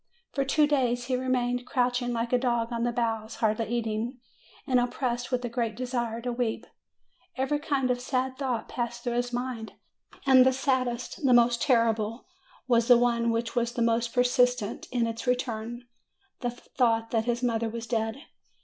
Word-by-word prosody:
For 275 - 0
two 295 +3 +3
days 250 -4 +1
he 255 0 0
remained 250 -1 -1
crouching 245 -1 0
like 235 +1 -2
a 250 - +4
dog 240 -2 0
on 230 - -2
the 240 - +1
bows, 225 -2 -2
hardly 220 0 0
eating, 230 +2 -2 0.5
and 255 -3 +3
oppressed 245 0 -2
with 250 -1 0
a - - 0
great 235 -2 -2
de 255 +3 -4
sire 240 -2 -2
to 245 +1 -2
weep. 235 -2 -2 0.7
Every 270 +3 0
kind 275 -4 0
of 245 0 -1
sad 260 0 -1
thought 255 -5 -2
passed 240 -1 -4
through 240 -2 -1
his 245 0 -1
mind, 245 -2 -4 0.5
and 260 -2 +7
the 260 0 +4
saddest, 255 -1 -1
the 255 -3 +5
most 240 0 +4
terrible, 230 -2 +1 0.4
was 235 -2 +3
the 245 -2 +8
one 235 -1 +2
which 230 +1 -1
was 240 0 0
the 235 - 0
most 230 0 +1
persistent 245 -3 +1
in 245 -2 +1
its 230 +2 -5
return, 240 -1 -2 0.6
the 245 - -1
thought 230 -2 0
that 225 -1 +1
his 240 +1 -1
mother 230 -2 0
was 230 +1 -5
dead. 225 +3 -2
240 Hz, 180 wpm, -28 LUFS, 230-250 Hz, 0.7 s, the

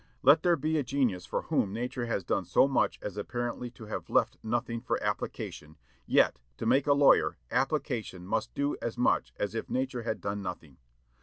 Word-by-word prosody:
Let 145 +4 +7
there 175 -1 +4
be 155 +1 0
a - - 0
genius 125 -9 0
for - - -2
whom 95 - 0
nature 120 +2 -3
has 100 -4 -1
done - - -1
so - - +4
much 135 - +1
as 105 - -5
apparently 120 +3 -3
to 115 -2 -12
have 105 - -5
left - - +2
nothing 115 +1 -2
for 125 - -1
application, 75 +1 -4 0.3
yet, - - +4 0.2
to - - -4
make 130 +5 +3
a 145 - +6
lawyer, 140 0 +5
application 125 - -1
must 110 +3 -1
do 140 +1 0
as 120 +1 -3
much 125 - +2
as 105 -1 -2
if 115 - -4
nature 130 -1 -1
had 115 - -3
done 100 0 -3
nothing. 85 -7 -7
120 Hz, 190 wpm, -30 LUFS, 105-135 Hz, 0.3 s, Let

